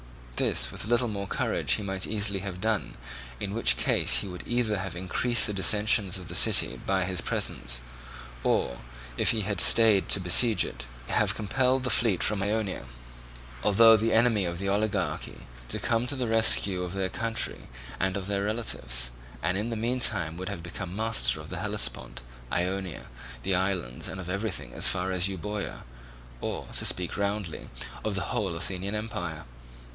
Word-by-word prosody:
This, -, -, +1 dB
with -, -, -5 dB
a -, -, -7 dB
little 120 Hz, +1 st, +2 dB
more 100 Hz, -2 st, -4 dB
courage, -, -, 0 dB
he 105 Hz, -, -1 dB
might 95 Hz, -1 st, -3 dB
easily 100 Hz, -2 st, +2 dB
have 95 Hz, -1 st, -6 dB
done, 110 Hz, 0 st, -1 dB, 0.4 s
in 100 Hz, -, -3 dB
which 115 Hz, -, +3 dB
case -, -, +3 dB
he -, -, -5 dB
would 90 Hz, -1 st, -7 dB
either 120 Hz, -4 st, 0 dB
have 95 Hz, -3 st, -5 dB
increased 115 Hz, +7 st, +1 dB
the 105 Hz, -, -1 dB
dissensions 105 Hz, -1 st, +2 dB
of 90 Hz, -, -9 dB
the -, -, -8 dB
city -, -, +2 dB
by 95 Hz, -1 st, +1 dB
his 90 Hz, -2 st, 0 dB
presence, -, -, -1 dB, 0.6 s
or, 60 Hz, -, +1 dB, 0.4 s
if -, -, +3 dB
he 110 Hz, -, +2 dB
had 100 Hz, -2 st, -1 dB
stayed 110 Hz, -4 st, +6 dB
to -, -, +3 dB
besiege 105 Hz, +5 st, +4 dB
it, -, -, -8 dB, 0.2 s
have -, -, +2 dB
compelled 130 Hz, +5 st, +1 dB
the 125 Hz, -, 0 dB
fleet 110 Hz, -7 st, +3 dB
from 105 Hz, -2 st, 0 dB
Ionia, 100 Hz, -, -2 dB, 0.7 s
although 110 Hz, -, +7 dB
the 110 Hz, +1 st, +1 dB
enemy 115 Hz, -3 st, +4 dB
of 85 Hz, 0 st, -3 dB
the 100 Hz, +2 st, -3 dB
oligarchy, 105 Hz, +2 st, -1 dB, 0.2 s
to -, -, -2 dB
come 115 Hz, +1 st, 0 dB
to 140 Hz, -, +2 dB
the 125 Hz, -2 st, -2 dB
rescue 110 Hz, -4 st, +3 dB
of 90 Hz, 0 st, -4 dB
their 95 Hz, -1 st, -1 dB
country 115 Hz, +3 st, -3 dB, 0.3 s
and 95 Hz, +1 st, 0 dB
of 95 Hz, -, -4 dB
their 100 Hz, 0 st, -1 dB
relatives, 60 Hz, -, -1 dB, 0.3 s
and 90 Hz, +1 st, +2 dB
in 105 Hz, +4 st, -1 dB
the 115 Hz, -, -2 dB
meantime 115 Hz, -8 st, +1 dB
would 95 Hz, +2 st, -4 dB
have 95 Hz, -5 st, -5 dB
become 85 Hz, +1 st, -6 dB
master 105 Hz, -, +1 dB
of 75 Hz, -, -10 dB
the 95 Hz, -, -4 dB
Hellespont, 100 Hz, -, -2 dB, 0.3 s
Ionia, 90 Hz, 0 st, -2 dB, 0.4 s
the 95 Hz, -, 0 dB
islands, 90 Hz, -10 st, -1 dB
and 95 Hz, -, -5 dB
of 90 Hz, -, -7 dB
everything 100 Hz, +4 st, -3 dB
as -, -, +2 dB
far 95 Hz, +1 st, 0 dB
as 90 Hz, 0 st, +1 dB
Euboea, 100 Hz, +2 st, -4 dB, 0.6 s
or, -, -, -3 dB
to -, -, -1 dB
speak 90 Hz, -1 st, -1 dB
roundly, 100 Hz, -4 st, -2 dB, 0.3 s
of 105 Hz, -2 st, -2 dB
the 95 Hz, -, -3 dB
whole 95 Hz, -5 st, -1 dB
Athenian 95 Hz, +4 st, -3 dB
empire. 90 Hz, -7 st, -4 dB
100 Hz, 180 wpm, -28 LUFS, 90-110 Hz, 0.7 s, although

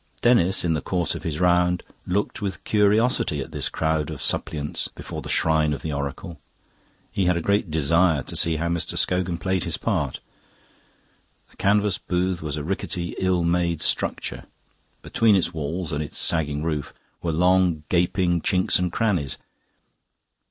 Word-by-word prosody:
Denis, 95 Hz, -7 st, +4 dB
in 85 Hz, -, +2 dB
the 75 Hz, -, -1 dB
course 90 Hz, -3 st, 0 dB
of -, -, -6 dB
his 80 Hz, -2 st, -3 dB
round, 90 Hz, 0 st, +3 dB, 0.2 s
looked 100 Hz, +4 st, -1 dB
with 95 Hz, -5 st, -4 dB
curiosity 105 Hz, -, +2 dB
at 70 Hz, +4 st, -5 dB
this 75 Hz, -3 st, -2 dB
crowd 80 Hz, -1 st, -1 dB
of 80 Hz, -3 st, -6 dB
suppliants 75 Hz, -1 st, -1 dB
before -, -, -8 dB
the -, -, -8 dB
shrine 80 Hz, -1 st, +2 dB
of 70 Hz, -, -6 dB
the 80 Hz, -, -3 dB
oracle. 70 Hz, +4 st, -5 dB, 0.7 s
He 95 Hz, -, 0 dB
had 90 Hz, -1 st, +3 dB
a -, -, +1 dB
great 100 Hz, +2 st, +1 dB
desire 80 Hz, 0 st, +2 dB
to -, -, -8 dB
see 80 Hz, -1 st, +2 dB
how 80 Hz, +2 st, -1 dB
Mr. 85 Hz, -1 st, -1 dB
Scogan 90 Hz, -2 st, 0 dB
played 95 Hz, 0 st, -1 dB
his -, -, -2 dB
part. -, -, -1 dB, 1.3 s
The -, -, -24 dB
canvas 100 Hz, 0 st, +2 dB
booth 90 Hz, 0 st, -1 dB
was 75 Hz, -1 st, -3 dB
a 75 Hz, -, -4 dB
rickety, 85 Hz, 0 st, -3 dB
ill 95 Hz, -2 st, +1 dB
made 85 Hz, -2 st, +1 dB
structure. -, -, -1 dB, 0.6 s
Between 115 Hz, -3 st, +3 dB
its 90 Hz, -2 st, +1 dB
walls 80 Hz, +2 st, -3 dB
and 75 Hz, -, -1 dB
its 75 Hz, -, -4 dB
sagging 75 Hz, -3 st, +1 dB
roof 75 Hz, -3 st, -3 dB, 0.3 s
were 85 Hz, -, -1 dB
long 90 Hz, -1 st, +3 dB
gaping 90 Hz, 0 st, +2 dB
chinks 90 Hz, +1 st, +2 dB
and 90 Hz, -1 st, 0 dB
crannies. 90 Hz, -10 st, 0 dB
85 Hz, 165 wpm, -24 LUFS, 80-95 Hz, 1.3 s, Denis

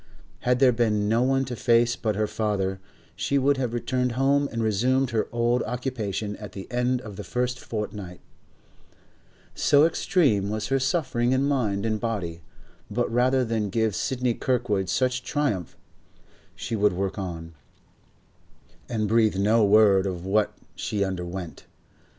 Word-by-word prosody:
Had 125 Hz, 0 st, +1 dB
there 130 Hz, -1 st, +5 dB
been 110 Hz, -3 st, +1 dB
no 115 Hz, +3 st, +2 dB
one 135 Hz, +1 st, +2 dB
to 125 Hz, -1 st, -5 dB
face 120 Hz, +1 st, +3 dB
but 110 Hz, -3 st, -2 dB
her 105 Hz, +1 st, +1 dB
father, 100 Hz, -3 st, -2 dB, 0.4 s
she 140 Hz, -, 0 dB
would 140 Hz, +1 st, +2 dB
have 125 Hz, -3 st, -1 dB
returned 125 Hz, +1 st, -1 dB
home 140 Hz, +3 st, +2 dB
and 115 Hz, -1 st, -2 dB
resumed 125 Hz, +5 st, +1 dB
her 110 Hz, -2 st, 0 dB
old 120 Hz, +1 st, +1 dB
occupation 110 Hz, -5 st, -3 dB
at 105 Hz, -1 st, -9 dB
the 95 Hz, -, -7 dB
end 125 Hz, +1 st, 0 dB
of 105 Hz, -5 st, -9 dB
the -, -, -5 dB
first 125 Hz, 0 st, -2 dB
fortnight, 105 Hz, -5 st, -6 dB, 1.3 s
so 145 Hz, +1 st, +4 dB
extreme 140 Hz, -, +2 dB
was 110 Hz, +1 st, -3 dB
her 135 Hz, 0 st, +2 dB
suffering 130 Hz, -4 st, 0 dB
in 130 Hz, +1 st, +2 dB
mind 110 Hz, -8 st, 0 dB
and 110 Hz, -1 st, 0 dB
body; 95 Hz, -8 st, -3 dB, 0.5 s
but 115 Hz, +2 st, -1 dB
rather 130 Hz, +1 st, +3 dB
than 110 Hz, -3 st, -1 dB
give 110 Hz, 0 st, 0 dB
Sidney 125 Hz, -2 st, 0 dB
Kirkwood 110 Hz, -7 st, -1 dB
such 130 Hz, -1 st, +1 dB
a -, -, -23 dB
triumph, 130 Hz, -, -2 dB, 0.8 s
she 115 Hz, -, -4 dB
would 105 Hz, -2 st, +2 dB
work 95 Hz, +2 st, -3 dB
on, 85 Hz, -3 st, -6 dB, 1.4 s
and 110 Hz, -3 st, -1 dB
breathe 110 Hz, -1 st, +3 dB
no 105 Hz, +3 st, +3 dB
word 100 Hz, -2 st, +5 dB
of 90 Hz, -2 st, -5 dB
what 105 Hz, +2 st, +1 dB, 0.2 s
she 105 Hz, -2 st, -2 dB
underwent. 90 Hz, -2 st, -5 dB
115 Hz, 155 wpm, -25 LUFS, 100-125 Hz, 1.4 s, there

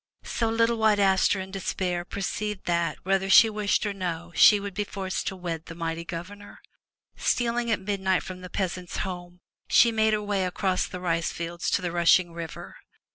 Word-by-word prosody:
So 230 Hz, -, -1 dB
little 230 Hz, +1 st, +2 dB
White 220 Hz, -1 st, +4 dB
Aster 195 Hz, 0 st, +3 dB
in 190 Hz, 0 st, -6 dB
despair 185 Hz, -2 st, -2 dB
perceived 200 Hz, +2 st, -4 dB
that, 170 Hz, -3 st, 0 dB
whether 195 Hz, +1 st, 0 dB
she 225 Hz, +2 st, +7 dB
wished 210 Hz, 0 st, 0 dB
or 205 Hz, -, -1 dB
no, 175 Hz, -3 st, -4 dB
she 205 Hz, -, +7 dB
would 200 Hz, -1 st, -6 dB
be 205 Hz, -, -1 dB
forced 195 Hz, -2 st, -4 dB
to 190 Hz, -, -2 dB
wed 170 Hz, -3 st, -5 dB
the 165 Hz, -, -8 dB
mighty 165 Hz, 0 st, -3 dB
Governor. 185 Hz, +5 st, -8 dB, 0.6 s
Stealing 240 Hz, 0 st, 0 dB
at 220 Hz, -, +1 dB
midnight 190 Hz, -1 st, 0 dB
from 185 Hz, -1 st, -8 dB
the 180 Hz, -, -9 dB
peasant's 180 Hz, -2 st, -3 dB
home, 180 Hz, -1 st, -8 dB, 0.3 s
she 235 Hz, -, +6 dB
made 220 Hz, -1 st, +2 dB
her 210 Hz, 0 st, 0 dB
way 205 Hz, -2 st, 0 dB
across 185 Hz, +1 st, -1 dB
the 180 Hz, -, -7 dB
rice 165 Hz, -2 st, -1 dB
fields 170 Hz, 0 st, -4 dB
to -, -, 0 dB
the 175 Hz, -, -2 dB
rushing 175 Hz, 0 st, +3 dB
river. 165 Hz, -1 st, -8 dB
190 Hz, 185 wpm, -26 LUFS, 175-205 Hz, 0.6 s, she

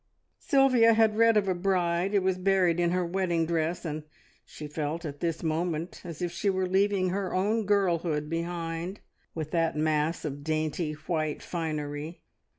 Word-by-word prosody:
Sylvia 255 Hz, -5 st, +4 dB
had 220 Hz, -1 st, +4 dB
read 230 Hz, 0 st, +5 dB
of 200 Hz, -2 st, +2 dB
a 190 Hz, -, +2 dB
bride 180 Hz, 0 st, 0 dB
who 200 Hz, -, +4 dB
was 185 Hz, -1 st, +1 dB
buried 185 Hz, -3 st, +2 dB
in 175 Hz, -1 st, +2 dB
her 180 Hz, 0 st, 0 dB
wedding 170 Hz, -2 st, 0 dB
dress, 165 Hz, +1 st, -1 dB
and 155 Hz, -1 st, -3 dB, 0.4 s
she 155 Hz, -, -10 dB
felt 150 Hz, +3 st, -3 dB
at 145 Hz, -2 st, -6 dB
this 165 Hz, -1 st, -2 dB
moment 165 Hz, +1 st, -2 dB
as 170 Hz, -1 st, -6 dB
if 175 Hz, -, -1 dB
she 175 Hz, +4 st, -1 dB
were 190 Hz, -1 st, +1 dB
leaving 190 Hz, 0 st, +2 dB
her 190 Hz, 0 st, -2 dB
own 210 Hz, +3 st, +1 dB
girlhood 170 Hz, -7 st, +1 dB
behind, 170 Hz, +2 st, -4 dB, 0.3 s
with 155 Hz, -2 st, -4 dB
that 165 Hz, -2 st, +1 dB
mass 155 Hz, +1 st, 0 dB
of 145 Hz, -1 st, -5 dB
dainty 155 Hz, +1 st, -1 dB
white 155 Hz, 0 st, -3 dB
finery. 155 Hz, -1 st, -4 dB
170 Hz, 165 wpm, -28 LUFS, 155-190 Hz, 0.4 s, read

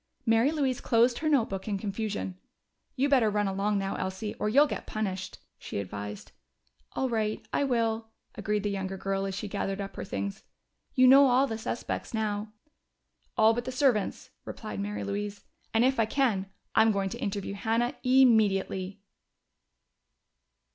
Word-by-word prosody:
Mary 225 Hz, +3 st, +4 dB
Louise 275 Hz, -5 st, 0 dB
closed 235 Hz, 0 st, +3 dB
her 310 Hz, -, 0 dB
notebook 220 Hz, -9 st, +1 dB
in 205 Hz, -2 st, -1 dB
confusion. 200 Hz, -1 st, -3 dB, 0.6 s
"You 275 Hz, +1 st, +2 dB
better 255 Hz, -6 st, +4 dB
run 205 Hz, 0 st, 0 dB
along 200 Hz, +2 st, 0 dB
now, 195 Hz, 0 st, -2 dB
Elsie, 190 Hz, +3 st, -3 dB
or 210 Hz, -, 0 dB
you'll 280 Hz, +7 st, +6 dB
get -, -, -5 dB
punished," 190 Hz, -3 st, -3 dB, 0.2 s
she -, -, -6 dB
advised. 100 Hz, +1 st, -6 dB, 0.6 s
"All 265 Hz, -, 0 dB
right, 220 Hz, -2 st, -2 dB
I 285 Hz, -, +2 dB
will," 230 Hz, -3 st, 0 dB, 0.3 s
agreed 210 Hz, 0 st, -2 dB
the 205 Hz, -, 0 dB
younger 195 Hz, -1 st, -3 dB
girl 195 Hz, +1 st, -2 dB
as 195 Hz, -, -4 dB
she 210 Hz, -, -4 dB
gathered 195 Hz, -1 st, -3 dB
up 195 Hz, -1 st, -5 dB
her -, -, -5 dB
things. 200 Hz, 0 st, -4 dB, 0.5 s
"You 255 Hz, -, +6 dB
know 275 Hz, +2 st, +8 dB
all 255 Hz, +2 st, +4 dB
the 225 Hz, -4 st, -4 dB
suspects 230 Hz, +1 st, -4 dB
now." 210 Hz, -1 st, -2 dB, 0.9 s
"All 220 Hz, +1 st, +6 dB
but 240 Hz, +1 st, -3 dB
the 255 Hz, -, -3 dB
servants," 255 Hz, -5 st, +1 dB
replied 215 Hz, -2 st, -6 dB
Mary 205 Hz, +1 st, -3 dB
Louise. 200 Hz, 0 st, -4 dB, 0.3 s
"And 225 Hz, +2 st, +3 dB
if 265 Hz, -1 st, +2 dB
I 225 Hz, -, +3 dB
can, 220 Hz, -7 st, +1 dB, 0.3 s
I'm 220 Hz, 0 st, +5 dB
going 195 Hz, -2 st, 0 dB
to 235 Hz, -, -6 dB
interview 200 Hz, -3 st, -3 dB
Hannah 230 Hz, +5 st, 0 dB
immediately." 205 Hz, -7 st, +3 dB
215 Hz, 160 wpm, -28 LUFS, 195-240 Hz, 0.9 s, know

